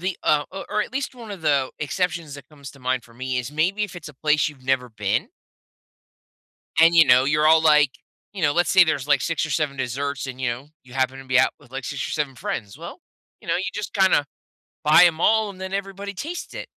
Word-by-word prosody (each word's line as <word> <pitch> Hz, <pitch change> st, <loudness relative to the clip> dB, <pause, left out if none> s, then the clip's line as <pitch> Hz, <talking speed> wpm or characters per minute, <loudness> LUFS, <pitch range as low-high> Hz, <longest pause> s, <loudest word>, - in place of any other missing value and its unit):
the 185 Hz, 0 st, -2 dB
uh, 150 Hz, -1 st, +3 dB
o 195 Hz, -, -7 dB
or 210 Hz, -, 0 dB
at 225 Hz, -, -9 dB
least 270 Hz, -1 st, -3 dB
one 230 Hz, -3 st, -10 dB
of 195 Hz, -5 st, -8 dB
the 140 Hz, -4 st, +1 dB
exceptions 170 Hz, -1 st, -2 dB
that 140 Hz, -, -12 dB
comes 140 Hz, -3 st, -12 dB
to 140 Hz, -, -18 dB
mind 130 Hz, -1 st, -1 dB
for 115 Hz, -, -19 dB
me 130 Hz, 0 st, -3 dB
is 125 Hz, +3 st, -5 dB
maybe 185 Hz, +7 st, +1 dB
if 195 Hz, -, -9 dB
it's 160 Hz, -3 st, -9 dB
a 150 Hz, -, -13 dB
place 150 Hz, +2 st, +2 dB
you've 135 Hz, -4 st, -14 dB
never 130 Hz, -2 st, 0 dB
been 105 Hz, -2 st, -2 dB, 1.5 s
and, 165 Hz, +1 st, +6 dB
you 165 Hz, -1 st, +8 dB
know, 125 Hz, +1 st, +6 dB
you're 150 Hz, +2 st, +2 dB
all, 160 Hz, 0 st, +6 dB
like 150 Hz, -3 st, +5 dB, 0.4 s
you 190 Hz, -4 st, -7 dB
know, 145 Hz, -, +3 dB
let's 175 Hz, +3 st, +1 dB
say 190 Hz, -2 st, +7 dB
there's, 150 Hz, -3 st, -2 dB
like, 145 Hz, -2 st, +3 dB
6 165 Hz, -1 st, -1 dB
or -, -, -8 dB
7 145 Hz, -4 st, -1 dB
desserts 135 Hz, +1 st, -3 dB
and, 130 Hz, 0 st, -7 dB
you 130 Hz, -2 st, -1 dB
know, 125 Hz, +5 st, -7 dB, 0.2 s
you 125 Hz, -, -16 dB
happen 130 Hz, 0 st, -1 dB
to 135 Hz, -, -10 dB
be 130 Hz, -1 st, +2 dB
out -, -, +2 dB
with, 125 Hz, -, -21 dB
like, 135 Hz, -1 st, -6 dB
6 140 Hz, -3 st, -3 dB
or -, -, -6 dB
7 145 Hz, -3 st, -2 dB
friends. 105 Hz, -3 st, -5 dB
Well, -, -, -9 dB, 0.4 s
you -, -, -16 dB
know, -, -, +2 dB
you 185 Hz, -, -2 dB
just 210 Hz, -, -6 dB
kinda 190 Hz, -7 st, +3 dB, 0.6 s
buy 155 Hz, +3 st, +7 dB
'em 165 Hz, -2 st, +2 dB
all 220 Hz, +2 st, +3 dB
and 185 Hz, -2 st, -11 dB
then 190 Hz, +1 st, -6 dB
everybody 200 Hz, +1 st, -4 dB
taste 330 Hz, -, -6 dB
it. -, -, -6 dB
150 Hz, 245 wpm, -23 LUFS, 130-180 Hz, 1.5 s, you